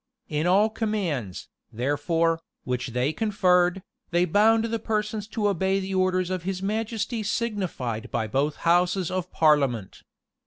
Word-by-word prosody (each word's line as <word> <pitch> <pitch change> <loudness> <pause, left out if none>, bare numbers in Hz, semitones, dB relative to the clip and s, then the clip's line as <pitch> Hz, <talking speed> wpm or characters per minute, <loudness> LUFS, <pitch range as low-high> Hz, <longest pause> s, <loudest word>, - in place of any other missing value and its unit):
In 150 +2 0
all 205 +4 +4
commands, 180 - -2 0.2
therefore, 145 +7 0 0.2
which 125 0 -2
they 125 +5 -1
conferred, 180 -2 +2 0.3
they 175 0 +2
bound 220 +5 +4
the 230 0 -2
persons 210 -1 -2
to 210 -1 -1
obey 190 0 +1
the 195 0 -4
orders 185 -1 +1
of 185 -1 -2
his 185 +1 -3
majesty 220 +2 -2
signified 200 - -3
by 110 - -1
both 140 +7 0
houses 175 +1 +2
of 185 -2 -3
parliament. 140 -10 +2
185 Hz, 140 wpm, -25 LUFS, 150-210 Hz, 0.3 s, all